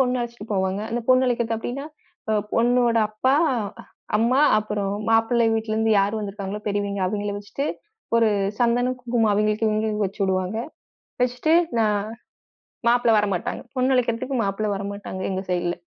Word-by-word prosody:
பொண்ணு 250 -1 +2
அழைச்சிட்டு 235 -2 -6
போவாங்க. 190 +1 0
அந்தப் 235 0 -3
பொண்ணு 255 0 +5
அழைக்கறக்கு 230 -2 0
அப்படீன்னா, 265 +5 -5 0.4
அ - - +3 0.2
பொண்ணோட 240 0 +3
அப்பா, 260 +6 +1 0.2
அ - - 0 0.6
அம்மா 250 +5 +3 0.2
அப்புறம் 205 -2 -2 0.2
மாப்பிள்ளை 225 +1 +3
வீட்டுலருந்து 220 0 0
யார் 205 +3 0
வந்திருக்காங்களோ, 200 0 -5
பெரியவைங்க 200 -1 -1
அவைங்கள 205 +1 -2
வச்சுட்டு, 275 +8 -4 0.5
ஒரு 225 -1 +4 0.3
சந்தனம், 245 +2 +2
குங்குமம் 230 -3 +1
அவைங்களுக்கு 215 +1 +1
இவைங்களுக்கு 215 -1 0
வச்சிடுவாங்க. 190 +1 -1 0.6
வச்சிட்டு 250 +6 +1 0.3
நா 225 - +4 1.1
மாப்பிளை 240 -1 +3
வரமாட்டாங்க. 200 -4 -2
பொண்ணு 260 +1 +2
அழைக்கறதுக்கு 250 +2 0
மாப்பிள்ளை 205 +1 -1
வரமாட்டாங்க 200 -1 -6
எங்க 190 +1 -3
சைடுல. 175 -1 0
220 Hz, 135 wpm, -23 LUFS, 200-240 Hz, 1.1 s, பொண்ணு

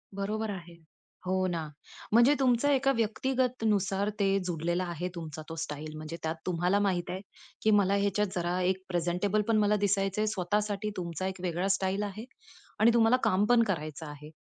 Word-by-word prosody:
बरोबर 215 +2 -2
आहे. 175 -3 -8 0.5
हो, 185 0 +1
ना. 165 -3 -2 0.5
म्हणजे 240 +5 +6
तुमचा 260 +2 +3
एका 275 0 +3
व्यक्तिगतनुसार 225 -4 0
ते 200 - +3 0.2
जुडलेला 175 +2 -1
आहे 175 +2 -3
तुमचा 160 -2 -6
तो 165 - -5
स्टाईल. 155 +1 -6
म्हणजे 155 +2 -6
त्यात 160 0 -1
तुम्हाला 180 +2 +1
माहित 190 -4 0
आहे 185 +1 -4 0.4
की 220 - +4
मला 200 0 +2
ह्याच्यात 205 +1 +1
जरा 175 0 -1
एक 185 +1 0
प्रेझेंटेबल 180 +4 0
पण 225 -1 +3
मला 210 0 +3
दिसायचंय. 195 +1 +1
स्वतःसाठी 205 +3 -1
तुमचा 175 0 -3
एक 190 -1 -6
वेगळा 180 +1 -1
स्टाईल 195 +1 -1
आहे. 210 +2 -5 0.5
आणि 225 +2 +6
तुम्हाला 230 +1 +5
काम 205 -2 +3
पण 240 -1 +6
करायचं 155 -3 -5
आहे. 150 0 -9
190 Hz, 165 wpm, -29 LUFS, 175-215 Hz, 0.5 s, म्हणजे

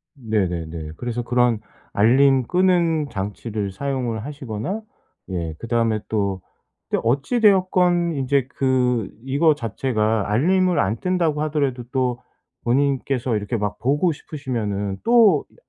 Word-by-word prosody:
네네네. 85 - -2
그래서 120 0 -3
그런 120 -2 +2 0.3
알림 130 +5 +4
끄는 170 -3 +2
장치를 100 0 -4
사용을 120 0 -3
하시거나 140 - -5 0.5
예 85 -4 -3
그다음에 115 -2 0
또, 100 -3 -1 0.5
또 - - +2
어찌 140 - +1
되었건 180 -5 +3
인제 135 -1 +1
그 125 -5 +1
이거 145 +4 +3
자체가 110 -4 -1
알림을 180 - +2
안 100 +4 +1
뜬다고 170 -5 0
하더라도 140 -5 -1
또 125 -2 0 0.4
본인께서 130 -1 0
이렇게 105 +3 -3
막 105 -1 -3
보고 145 +8 +2
싶으시면은 110 -10 -4
또 225 -10 +5
이 - - -27
125 Hz, 270 characters per minute, -22 LUFS, 110-150 Hz, 0.5 s, 또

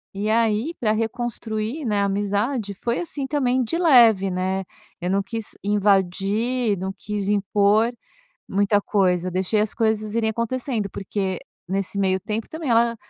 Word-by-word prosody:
E 205 +2 -1
aí, 225 +7 +1
pra 215 -3 +1
reconstruir, 225 +3 -3
né, 210 -3 +1
a - - +2
amizade, 205 +2 -1
foi 235 0 0
assim 295 -5 -4
também 260 -3 +1
de 330 +9 -1
leve, 235 - +6
né. 185 +1 -1 0.4
Eu 180 - -2
não 195 +1 +1
quis 225 +2 -6
invadir, 205 +3 +1
não 190 +2 -4
quis 205 -2 -4
impor 205 +2 +3 0.6
muita 205 +1 +2
coisa, 185 -3 +1
deixei 190 +4 +1
as 210 -1 -1
coisas 220 -1 0
irem 225 -1 +1
acontecendo, 235 -1 -2
porque 195 -2 -3 0.3
nesse 195 +1 -2
meio 190 -1 +2
tempo, 215 +3 -4
também, 315 -4 -4
ela, 235 0 +3
210 Hz, 150 wpm, -23 LUFS, 195-235 Hz, 0.6 s, leve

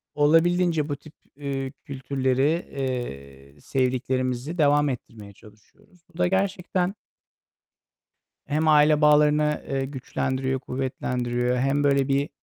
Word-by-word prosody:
olabildiğince 165 +1 +3
bu 145 - -1
tip, 155 +2 -16 0.3
ııı, 135 -2 -3
kültürleri, 135 0 0 0.2
eee, 70 - -6
sevdiklerimizi 130 - -1
devam 145 -1 +3
ettirmeye 110 -5 -8
çalışıyoruz. 110 - -21
Bu - - -15
da 180 0 +2
gerçekten 190 -1 0 1.5
hem 155 +2 0
aile 150 0 +5
bağlarını, 150 0 +3
eee, 135 -1 -1
güçlendiriyor, 130 -1 -2
kuvvetlendiriyor. 125 -1 -2
Hem 135 +3 +1
böyle 140 -1 +2
bir, 140 +1 0
140 Hz, 105 wpm, -25 LUFS, 130-150 Hz, 1.5 s, aile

